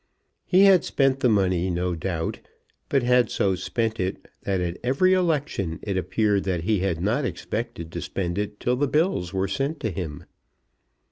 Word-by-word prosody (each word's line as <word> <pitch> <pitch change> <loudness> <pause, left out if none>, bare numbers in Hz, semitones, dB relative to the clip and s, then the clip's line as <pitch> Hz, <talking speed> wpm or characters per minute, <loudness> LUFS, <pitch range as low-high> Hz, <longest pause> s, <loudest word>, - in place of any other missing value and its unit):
He 185 +1 +5
had 195 -3 +6
spent 135 -1 +1
the 125 - +3
money 95 -4 +2
no 90 0 -1
doubt, 80 0 -3 0.5
but 135 -3 +2
had 125 -2 +3
so 95 - +1
spent 110 +4 -2
it 95 +1 -3
that 95 -2 -1
at 90 -1 -3
every 140 +10 +3
election 145 - 0
it 100 -2 -2
appeared 100 +2 +1
that 90 -4 -1
he 105 +2 +1
had 90 -3 -1
not 115 +9 +1
expected 110 -9 -4
to - - -5
spend 90 0 -3
it 105 0 -4
till 125 - +1
the 145 +2 +1
bills 150 - +1
were 95 0 0
sent 135 - -2
to 110 - -1
him. 80 -6 -5
100 Hz, 180 wpm, -25 LUFS, 90-130 Hz, 0.5 s, had